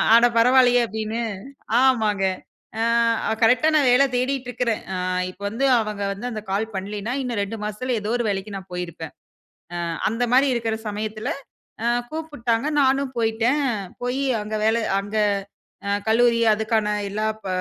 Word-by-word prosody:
அட! 235 Hz, +1 st, +7 dB
பரவால்லயே," 245 Hz, +1 st, +5 dB
அப்படீன்னு 220 Hz, +1 st, -3 dB, 0.6 s
ஆமாங்க. 220 Hz, -7 st, +2 dB, 0.5 s
அ -, -, -1 dB, 0.5 s
அ -, -, +2 dB
கரெக்ட்டா 250 Hz, +7 st, +5 dB
நான் 285 Hz, -4 st, +4 dB
வேலை 265 Hz, +3 st, +5 dB
தேடிட்டுருக்கிறேன். 250 Hz, -3 st, -1 dB
அ -, -, -2 dB, 0.3 s
இப்ப 185 Hz, -, -18 dB
வந்து 230 Hz, +6 st, -2 dB, 0.2 s
அவங்க 210 Hz, -2 st, -4 dB
வந்து 205 Hz, +5 st, -6 dB
அந்த 220 Hz, -, -4 dB
கால் 200 Hz, +3 st, 0 dB
பண்ணலைன்னா, 205 Hz, +4 st, -4 dB
இன்னும் 240 Hz, -5 st, -2 dB
2 200 Hz, +3 st, -4 dB
மாசத்தில 225 Hz, +4 st, -2 dB
ஏதோ 210 Hz, +1 st, -4 dB
ஒரு 240 Hz, -, -1 dB
வேலைக்கு 200 Hz, +1 st, -3 dB
நான் 190 Hz, -1 st, -9 dB
போயிருப்பேன். 170 Hz, -3 st, -6 dB, 0.6 s
அ -, -, -3 dB, 0.3 s
அந்த 230 Hz, +4 st, -2 dB
மாரி 270 Hz, +3 st, +5 dB
இருக்கிற 225 Hz, -2 st, -1 dB
சமயத்தில, 215 Hz, +1 st, -4 dB, 0.6 s
அ -, -, +1 dB, 0.2 s
கூப்பிட்டாங்க 290 Hz, -7 st, -2 dB
நானும் 270 Hz, 0 st, +2 dB
போயிட்டேன். 230 Hz, +5 st, +1 dB, 0.4 s
போயி 250 Hz, +3 st, -1 dB, 0.2 s
அங்க 215 Hz, +1 st, -5 dB
வேலை 225 Hz, +1 st, +2 dB, 0.2 s
அங்க 205 Hz, +2 st, -6 dB, 0.7 s
அ -, -, -1 dB, 0.2 s
கல்லூரி 235 Hz, +1 st, +4 dB
அதுக்கான 220 Hz, 0 st, 0 dB, 0.2 s
எல்லா 215 Hz, +2 st, -1 dB, 0.2 s
ப -, -, -7 dB
225 Hz, 150 wpm, -23 LUFS, 210-250 Hz, 0.7 s, அட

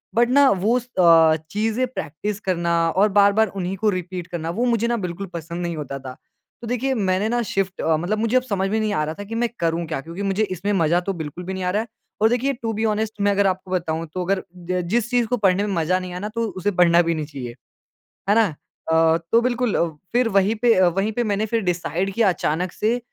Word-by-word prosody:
But 235 Hz, +1 st, +4 dB
ना 275 Hz, +1 st, +6 dB
वो 205 Hz, +6 st, +2 dB
स 245 Hz, -, -13 dB
अ, 165 Hz, -2 st, +6 dB, 0.2 s
चीज़ें 225 Hz, +4 st, 0 dB
प्रैक्टिस 205 Hz, -, -5 dB
करना 170 Hz, -4 st, -1 dB, 0.2 s
और 200 Hz, +3 st, +3 dB
बार-बार 205 Hz, +2 st, +4 dB
उन्हीं 185 Hz, 0 st, -2 dB
को 215 Hz, +3 st, +2 dB
रिपीट 180 Hz, -2 st, -4 dB
करना 165 Hz, -2 st, -4 dB
वो 245 Hz, -, +2 dB
मुझे 235 Hz, -1 st, +1 dB
ना 235 Hz, 0 st, 0 dB
बिल्कुल 185 Hz, +3 st, -5 dB
पसंद 170 Hz, +1 st, -5 dB
नहीं 170 Hz, -1 st, -3 dB
होता 140 Hz, -2 st, -5 dB
था। 130 Hz, -1 st, -8 dB, 0.5 s
तो 235 Hz, -, -7 dB
देखिए 250 Hz, +3 st, 0 dB
मैंने 195 Hz, -1 st, 0 dB
ना 240 Hz, +1 st, +1 dB
शिफ़्ट 195 Hz, -3 st, -2 dB
अ, 160 Hz, -1 st, +2 dB
मतलब 180 Hz, +7 st, -1 dB
मुझे 230 Hz, +3 st, +2 dB
अब 255 Hz, -, +1 dB
समझ 195 Hz, -5 st, -1 dB
में 220 Hz, -, 0 dB
नहीं 215 Hz, -1 st, 0 dB
आ 155 Hz, -, +1 dB
रहा 155 Hz, -, -4 dB
था -, -, -4 dB
कि 225 Hz, +3 st, -7 dB
मैं 235 Hz, 0 st, 0 dB
करूँ 165 Hz, 0 st, 0 dB
क्या? 155 Hz, -4 st, -3 dB
क्योंकि 170 Hz, +6 st, -8 dB
मुझे 195 Hz, +2 st, +1 dB
इसमें 195 Hz, +1 st, -2 dB
मज़ा 170 Hz, -2 st, +3 dB
तो 195 Hz, -, +1 dB
बिल्कुल 160 Hz, +1 st, -6 dB
भी 190 Hz, +2 st, -5 dB
नहीं 190 Hz, -1 st, -4 dB
आ 180 Hz, -, 0 dB
रहा 210 Hz, +3 st, +1 dB
है। 230 Hz, -, -7 dB, 0.3 s
और 220 Hz, -, +5 dB
देखिए, 250 Hz, +4 st, +1 dB
टू 230 Hz, -3 st, -4 dB
बी 220 Hz, +1 st, -1 dB
ऑनेस्ट 215 Hz, 0 st, 0 dB
मैं 205 Hz, 0 st, +3 dB
अगर 200 Hz, 0 st, +2 dB
आपको 185 Hz, 0 st, -3 dB
बताऊँ 165 Hz, -2 st, -1 dB
तो 185 Hz, -, -2 dB
अगर 195 Hz, +1 st, 0 dB
ज 180 Hz, +1 st, -3 dB
जिस 235 Hz, +2 st, +1 dB
चीज़ 245 Hz, -1 st, +3 dB
को 245 Hz, -, 0 dB
पढ़ने 195 Hz, -2 st, +2 dB
में 200 Hz, -, -2 dB
मज़ा 170 Hz, +2 st, +1 dB
नहीं 180 Hz, -1 st, -7 dB
आए 180 Hz, -, -5 dB
ना, 210 Hz, -, -4 dB
तो 230 Hz, +1 st, -2 dB
उसे 205 Hz, +3 st, 0 dB
पढ़ना 175 Hz, -2 st, +5 dB
भी 170 Hz, -, +2 dB
नहीं 155 Hz, -1 st, -3 dB
चाहिए। 135 Hz, -5 st, -7 dB, 0.8 s
है 205 Hz, -, +5 dB
ना? 225 Hz, 0 st, +5 dB, 0.5 s
अ, 160 Hz, 0 st, +4 dB, 0.2 s
तो 230 Hz, -, +6 dB
बिल्कुल 245 Hz, -2 st, 0 dB, 0.4 s
फिर 245 Hz, 0 st, +3 dB
वही 195 Hz, +3 st, +3 dB
पे 230 Hz, +1 st, +3 dB
अ, 185 Hz, 0 st, +4 dB
वहीं 195 Hz, +5 st, -1 dB
पे 240 Hz, +2 st, -1 dB
मैंने 210 Hz, 0 st, 0 dB
फिर 230 Hz, +1 st, 0 dB
डिसाइड 180 Hz, +2 st, -1 dB
किया 225 Hz, -2 st, +3 dB
अचानक 175 Hz, 0 st, -1 dB
से 225 Hz, +3 st, 0 dB
195 Hz, 250 wpm, -22 LUFS, 175-220 Hz, 0.8 s, ना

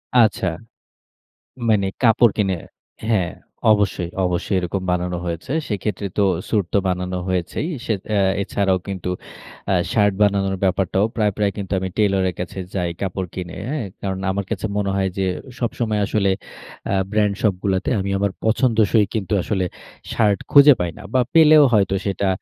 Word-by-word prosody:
আচ্ছা। 110 Hz, -5 st, +4 dB, 1.2 s
মানে 105 Hz, -3 st, +3 dB, 0.2 s
কাপড় 115 Hz, -2 st, +5 dB
কিনে 95 Hz, -3 st, +1 dB, 0.5 s
হ্যাঁ 95 Hz, -7 st, +1 dB, 0.4 s
অবশ্যই, 100 Hz, -4 st, +1 dB, 0.2 s
অবশ্যই 90 Hz, +2 st, -1 dB
এরকম 90 Hz, +2 st, -3 dB
বানানো 90 Hz, 0 st, -1 dB
হয়েছে। 85 Hz, +7 st, -4 dB, 0.2 s
সেইক্ষেত্রে 105 Hz, -1 st, -3 dB
তো 100 Hz, -, +4 dB, 0.3 s
স্যুট 105 Hz, -4 st, +1 dB
তো -, -, +4 dB
বানানো 90 Hz, 0 st, -2 dB
হয়েছেই। 90 Hz, -, -2 dB, 0.2 s
সে 110 Hz, -, +1 dB, 0.2 s
অ্যা 105 Hz, -2 st, +2 dB, 0.2 s
এছাড়াও 95 Hz, -1 st, +1 dB
কিন্তু, 95 Hz, -2 st, -4 dB, 0.6 s
আ -, -, +3 dB, 0.2 s
শার্ট 105 Hz, -2 st, +3 dB
বানানোর 100 Hz, -1 st, +2 dB
ব্যাপারটাও 95 Hz, +1 st, +2 dB
প্রায়, 105 Hz, -2 st, +2 dB
প্রায় 105 Hz, -1 st, +1 dB
কিন্তু 100 Hz, -2 st, -5 dB
আমি 95 Hz, 0 st, -3 dB
টেইলরের 95 Hz, -3 st, +2 dB
কাছে 90 Hz, +2 st, -5 dB, 0.2 s
যাই 90 Hz, -2 st, 0 dB
কাপড় 95 Hz, -1 st, -2 dB
কিনে, 90 Hz, -1 st, -6 dB
হ্যাঁ? 140 Hz, -6 st, -2 dB, 0.2 s
কারণ 95 Hz, -1 st, -3 dB
আমার 100 Hz, 0 st, -2 dB
কাছে 105 Hz, -1 st, -2 dB
মনে 100 Hz, -1 st, 0 dB
হয় 95 Hz, -1 st, +1 dB
যে, 95 Hz, -, +1 dB, 0.3 s
সবসময় 110 Hz, -3 st, -1 dB
আসলে 100 Hz, -1 st, +1 dB, 0.6 s
আ -, -, +1 dB, 0.2 s
ব্র্যান্ড 105 Hz, -1 st, +2 dB
শপগুলাতে, 95 Hz, -2 st, 0 dB
আমি 100 Hz, +1 st, -2 dB
আমার 100 Hz, 0 st, +1 dB
পছন্দসই 110 Hz, -2 st, +3 dB
কিন্তু, 105 Hz, -1 st, -2 dB
আসলে 95 Hz, -2 st, -1 dB, 0.5 s
শার্ট 105 Hz, -3 st, +2 dB
খুঁজে 140 Hz, 0 st, +9 dB
পাই 90 Hz, -1 st, -1 dB
না। -, -, -10 dB
বা 130 Hz, -, +4 dB
পেলেও 155 Hz, -2 st, +7 dB
হয়তো 100 Hz, -2 st, +3 dB
সেটা 100 Hz, 0 st, -1 dB
100 Hz, 155 wpm, -21 LUFS, 95-105 Hz, 1.2 s, খুঁজে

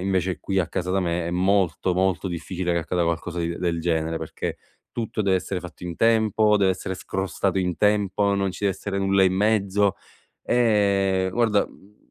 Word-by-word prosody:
invece 95 Hz, -1 st, 0 dB
qui 95 Hz, 0 st, -1 dB
a 85 Hz, -, -2 dB
casa 90 Hz, 0 st, -3 dB
da 95 Hz, -, +2 dB
me 85 Hz, -1 st, -1 dB
è -, -, -2 dB
molto, 95 Hz, 0 st, +1 dB
molto 95 Hz, 0 st, 0 dB
difficile 90 Hz, +1 st, -3 dB
che 85 Hz, -, +1 dB
accada 90 Hz, +1 st, -1 dB
qualcosa 85 Hz, +1 st, -2 dB
di 85 Hz, 0 st, -2 dB
del 85 Hz, -2 st, -1 dB
genere, 80 Hz, -1 st, 0 dB
perché -, -, -5 dB, 0.4 s
tutto 115 Hz, -1 st, -3 dB
deve 95 Hz, -1 st, +3 dB
essere 90 Hz, 0 st, -3 dB
fatto 90 Hz, 0 st, -10 dB
in 85 Hz, -, -4 dB
tempo, 110 Hz, -2 st, +3 dB
deve 95 Hz, -2 st, +3 dB
essere 95 Hz, 0 st, -5 dB
scrostato 95 Hz, +1 st, -2 dB
in 90 Hz, -2 st, -1 dB
tempo, 105 Hz, -1 st, +2 dB
non 100 Hz, -1 st, 0 dB
ci 100 Hz, -, -6 dB
dev'essere 100 Hz, 0 st, -1 dB
nulla 95 Hz, 0 st, +3 dB
in 95 Hz, 0 st, +2 dB
mezzo, 100 Hz, -1 st, +2 dB, 0.5 s
ehm, 100 Hz, -5 st, +2 dB
guarda, 110 Hz, -2 st, +2 dB
mhmm, 105 Hz, +2 st, -20 dB
95 Hz, 185 wpm, -24 LUFS, 90-100 Hz, 0.5 s, deve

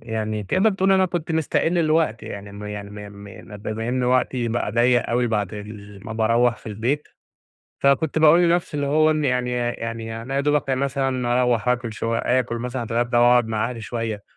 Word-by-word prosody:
يعني 110 Hz, -2 st, -3 dB
تقدَر 190 Hz, -, +2 dB
تقول 195 Hz, -1 st, +2 dB
أنا 190 Hz, -1 st, +4 dB
كنت 170 Hz, -1 st, -3 dB
مِستَقِل 160 Hz, +2 st, +1 dB
الوقت 155 Hz, -7 st, +1 dB
يعني 100 Hz, 0 st, -8 dB
مي 100 Hz, -, -10 dB, 0.2 s
م 100 Hz, +1 st, -12 dB
مي 100 Hz, -1 st, -10 dB
يعني -, -, -13 dB
ما 105 Hz, -, -9 dB
بما 110 Hz, +2 st, -4 dB
إن 125 Hz, +1 st, 0 dB
وقتي 125 Hz, -1 st, +1 dB
بقى 115 Hz, -2 st, -2 dB
ضَيَّق 120 Hz, +1 st, +3 dB
أوي 120 Hz, +1 st, +1 dB
بعد 105 Hz, -3 st, -1 dB
ال 105 Hz, -1 st, -10 dB
ما 110 Hz, -, -5 dB
باروَّح 115 Hz, +1 st, +2 dB
في -, -, -18 dB
البيت، 120 Hz, +8 st, -2 dB, 0.7 s
فكنت 140 Hz, +3 st, +2 dB
باقول 160 Hz, +2 st, +6 dB
لنفسي 170 Hz, -2 st, +1 dB
اللي 145 Hz, -1 st, -1 dB
هو 155 Hz, +2 st, +3 dB
إن 155 Hz, -1 st, 0 dB
يعني 125 Hz, -2 st, 0 dB
يع 120 Hz, -1 st, -1 dB
يع 120 Hz, -, -2 dB
يعني 115 Hz, 0 st, -5 dB
أنا 135 Hz, +3 st, -5 dB
يا 140 Hz, -, +2 dB
دوبك 145 Hz, -1 st, +1 dB
مثلًا 130 Hz, -2 st, 0 dB
أروح 120 Hz, -1 st, +1 dB
آكل 120 Hz, -2 st, 0 dB
شوي 115 Hz, +1 st, -2 dB
آكل 125 Hz, -1 st, 0 dB
مثلًا 125 Hz, +1 st, -4 dB
اتغدي 120 Hz, +1 st, -1 dB
وأقعد 120 Hz, 0 st, +5 dB
مع 110 Hz, +1 st, -1 dB
أهلي 115 Hz, -2 st, -7 dB
شويّة، 115 Hz, -2 st, -4 dB
120 Hz, 205 wpm, -22 LUFS, 110-140 Hz, 0.7 s, باقول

